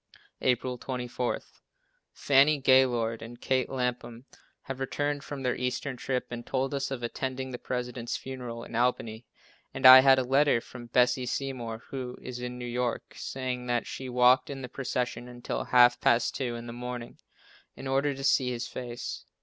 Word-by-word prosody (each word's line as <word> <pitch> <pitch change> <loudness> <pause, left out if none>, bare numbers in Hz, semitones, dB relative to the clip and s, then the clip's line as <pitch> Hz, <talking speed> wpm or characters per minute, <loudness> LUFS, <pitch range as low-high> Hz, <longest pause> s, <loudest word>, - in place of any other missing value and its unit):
April 125 0 0
24. 125 -1 -3 0.7
Fannie 145 +2 +4
Gaylord 125 -4 +3
and 120 +1 -9
Kate 130 -2 0
Lapham 125 -2 -3 0.4
have 135 -1 -6
returned 145 +2 -2
from 140 -2 -6
their 125 -1 +1
eastern 125 +2 -2
trip 125 +1 -2
and 120 0 -5
told 135 +2 -2
us 140 -1 -1
of 130 -3 -5
attending 130 +2 -3
the 120 - -6
President's 125 -1 -3
funeral 125 -3 -7
in - - -9
Albany, 115 -2 -1 0.5
and 135 - -2
I 130 0 +13
had 135 0 +6
a 130 - +2
letter 135 0 +3
from 120 0 -11
Bessie 125 +1 +2
Seymour, 120 -4 -4
who 125 -2 -5
is 125 -1 -7
in 125 0 -5
New 125 - -6
York, 120 0 -2
saying 125 -1 -4
that 120 -1 0
she 130 -1 -6
walked 125 +1 +4
in 135 -2 -6
the - - -4
procession 125 -2 -3
until 120 0 -4
half 120 -1 +5
past 120 0 +3
two 125 -3 -2
in 120 0 -7
the 115 - -7
morning, 125 0 -7 0.6
in - - -9
order 135 +1 +1
to 135 - -7
see 130 -2 +3
his 120 -1 -3
face. 120 0 -6
125 Hz, 175 wpm, -28 LUFS, 120-130 Hz, 0.7 s, I